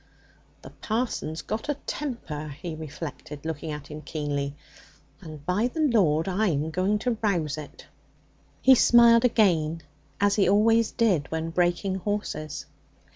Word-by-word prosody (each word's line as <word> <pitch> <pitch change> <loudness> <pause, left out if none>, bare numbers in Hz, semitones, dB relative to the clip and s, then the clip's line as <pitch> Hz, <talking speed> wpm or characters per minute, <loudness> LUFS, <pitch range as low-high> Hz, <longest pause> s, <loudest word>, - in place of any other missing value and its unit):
'The - - -9
parson's 220 -8 -2
got 220 +6 -4
a 295 - +1
temper,' 200 - -4
he 170 -2 -5
reflected, 150 -1 -8
looking 160 0 -4
at 150 -1 -5
him 150 +1 -7
keenly, 145 -2 -3 0.7
'and, 155 -4 -10
by 200 +7 +1
the 255 - -6
Lord, 195 - +3
I'm 180 -6 0
going 185 +5 +1
to 235 -3 0
rouse 170 -9 0
it!' 155 -1 -10 0.8
He 265 - +8
smiled 235 -1 +6
again 165 -9 +2 0.4
as 205 +1 +2
he 195 - +4
always 225 +3 +4
did 190 - +1
when 160 0 -3
breaking 175 +2 0
horses. 165 -8 -4
175 Hz, 135 wpm, -26 LUFS, 155-220 Hz, 0.8 s, He